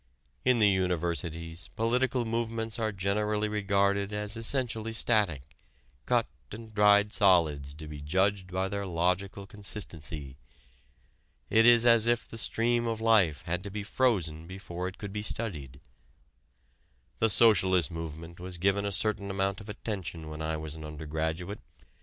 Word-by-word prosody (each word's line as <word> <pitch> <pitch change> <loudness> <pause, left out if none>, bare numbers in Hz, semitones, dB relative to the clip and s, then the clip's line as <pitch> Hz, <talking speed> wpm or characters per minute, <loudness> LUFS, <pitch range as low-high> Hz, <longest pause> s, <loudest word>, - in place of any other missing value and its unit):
In 125 -1 +3
the 105 -2 +5
Universities 85 -3 -2
political 125 +2 +1
movements 115 0 -2
are 110 -1 0
generally 105 +2 0
regarded 100 -1 +1
as 105 +1 -2
essentially 115 -1 -1
static, 100 - +1 0.5
cut - - +3 0.3
and 110 +1 -9
dried 105 0 +4
solids 80 -8 +3
to 80 0 -9
be 75 -1 -8
judged 95 +5 0
by 95 +1 -1
their 100 0 -4
logical 90 +3 -1
consistency. 80 -9 -5 1.1
It 115 +1 +5
is 120 -1 +7
as 115 -1 +6
if 120 0 +1
the 115 - -7
stream 120 +2 +1
of 115 -1 -2
life 100 -11 +3
had 90 +2 -2
to 100 - -5
be 105 +1 -5
frozen 90 -10 0
before 90 -1 -6
it 95 - -8
could 100 -2 -7
be 105 - -3
studied. 75 - -3 1.4
The 115 - +3
socialist 95 - +4
movement 80 +1 -7
was 90 0 -4
given 100 +3 +1
a - - -2
certain 100 0 0
amount 95 +1 -1
of 105 - -12
attention 85 -7 -5
when 75 0 -7
I 80 0 -2
was 80 -1 -5
an 80 -1 -9
undergraduate. 80 +5 -4
100 Hz, 145 wpm, -29 LUFS, 85-110 Hz, 1.4 s, is